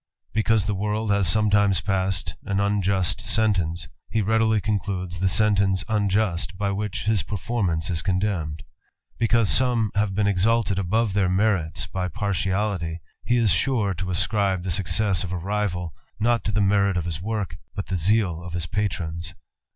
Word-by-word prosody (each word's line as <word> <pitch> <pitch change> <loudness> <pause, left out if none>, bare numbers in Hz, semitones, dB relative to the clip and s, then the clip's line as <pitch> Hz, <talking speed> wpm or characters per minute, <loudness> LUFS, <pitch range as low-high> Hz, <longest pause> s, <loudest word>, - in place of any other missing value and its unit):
Because 110 -2 +2
the 105 - 0
world 105 +2 -1
has 100 -3 +3
sometimes 100 +1 +3
unjust 95 -1 0
sentence, 95 -7 +1 0.2
he 110 -1 0
readily 110 +1 +2
concludes 95 -4 -2
the 95 - +2
sente 100 -1 +1
by 100 0 -1
which 105 0 -3
his 105 -2 +2
performance 95 -6 -2
is 85 -1 -1
condemned; 90 -5 -1 0.6
bee 115 - +2
have 110 -4 +2
been 105 0 +2
exalted 100 0 +2
above 100 +3 0
their 95 -2 +2
merits 90 -6 +1
by 90 +4 -3
partiality 95 -4 -1 0.3
to 110 -1 +2 0.2
ascribe 95 0 0
the 90 - -2
success 95 +1 +1
of 90 - -5
a 95 - -2
rival, 90 -2 -2 0.3
not 115 +2 +2
to 105 - 0
the 105 0 +1
m 95 -5 +1
work, 100 -7 -3 0.2
but 100 - -3
the 95 - -3
zeal 90 -1 +1
of 90 -1 -8
his 85 -1 -2
patrons. 85 -3 -3
100 Hz, 135 wpm, -24 LUFS, 90-105 Hz, 0.6 s, has